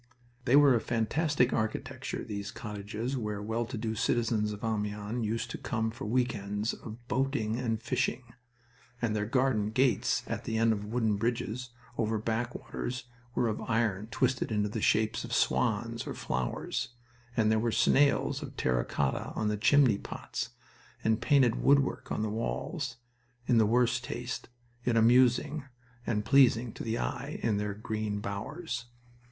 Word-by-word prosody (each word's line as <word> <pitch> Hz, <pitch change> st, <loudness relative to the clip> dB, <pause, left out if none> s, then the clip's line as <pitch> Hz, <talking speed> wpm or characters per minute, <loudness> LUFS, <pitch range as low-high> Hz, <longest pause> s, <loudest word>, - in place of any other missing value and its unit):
They 125 Hz, -, +5 dB
were 145 Hz, -2 st, +7 dB
of 115 Hz, -, +2 dB
fantastic 125 Hz, +3 st, +1 dB
architecture 110 Hz, 0 st, -2 dB
these 100 Hz, -1 st, -5 dB
Cottages 105 Hz, +4 st, -4 dB
where 105 Hz, -5 st, -2 dB
well 110 Hz, +3 st, -2 dB
to 120 Hz, -1 st, -5 dB
do 110 Hz, 0 st, -2 dB
citizens 115 Hz, -1 st, +1 dB
of 105 Hz, -1 st, -7 dB
Amiens 105 Hz, +1 st, -2 dB
used 115 Hz, +2 st, -2 dB
to -, -, -5 dB
come 110 Hz, -1 st, -1 dB
for 120 Hz, +4 st, -7 dB
week 125 Hz, +3 st, +1 dB
ends 105 Hz, +2 st, -2 dB
of 120 Hz, +2 st, -10 dB
boating 125 Hz, -3 st, 0 dB
and 115 Hz, -3 st, -1 dB
fishing 115 Hz, +2 st, -1 dB, 0.8 s
and 115 Hz, -3 st, 0 dB
their 105 Hz, 0 st, -1 dB
garden 120 Hz, -4 st, +2 dB
gates 130 Hz, +3 st, +2 dB
at -, -, -4 dB
the 110 Hz, -, -1 dB
end 115 Hz, 0 st, +4 dB
of 105 Hz, -1 st, -4 dB
wooden 110 Hz, -2 st, +1 dB
bridges 120 Hz, +2 st, -2 dB, 0.3 s
over 110 Hz, -1 st, +1 dB
back 115 Hz, +3 st, -2 dB
waters 125 Hz, +1 st, -4 dB, 0.3 s
were 120 Hz, -, +2 dB
of 110 Hz, -, -2 dB
iron 110 Hz, -3 st, 0 dB
twisted 125 Hz, +1 st, 0 dB
into 105 Hz, -1 st, +1 dB
the -, -, -3 dB
shapes 110 Hz, +1 st, +2 dB
of -, -, -6 dB
swans -, -, +1 dB
or -, -, -4 dB
flowers, 65 Hz, -, -2 dB, 0.5 s
and 110 Hz, -1 st, +4 dB
there 110 Hz, -, +3 dB
were 115 Hz, +1 st, +1 dB
snails 135 Hz, +5 st, +3 dB
of -, -, -8 dB
terra 60 Hz, -2 st, +1 dB
cotta -, -, -1 dB
on 110 Hz, -, 0 dB
the 105 Hz, -, +1 dB
chimney 125 Hz, 0 st, +4 dB
pots, -, -, -5 dB, 0.5 s
and 110 Hz, +1 st, +2 dB
painted 130 Hz, -3 st, +4 dB
woodwork 140 Hz, -1 st, +3 dB
on 110 Hz, -, 0 dB
the 110 Hz, -, -1 dB
walls, 110 Hz, -, -3 dB, 0.5 s
in 120 Hz, -2 st, +4 dB
the 110 Hz, -, +5 dB
worst 120 Hz, +2 st, +2 dB
taste, 120 Hz, 0 st, -5 dB, 0.3 s
yet 120 Hz, -2 st, +2 dB
amusing 125 Hz, +5 st, +4 dB, 0.4 s
and 105 Hz, -3 st, 0 dB
pleasing 120 Hz, -2 st, +5 dB
to -, -, -7 dB
the 115 Hz, 0 st, -1 dB
eye 135 Hz, +5 st, -3 dB
in 110 Hz, -3 st, +2 dB
their 105 Hz, -1 st, -2 dB
green 105 Hz, -1 st, -3 dB
bowers. 120 Hz, -, -4 dB
115 Hz, 165 wpm, -30 LUFS, 105-125 Hz, 0.8 s, were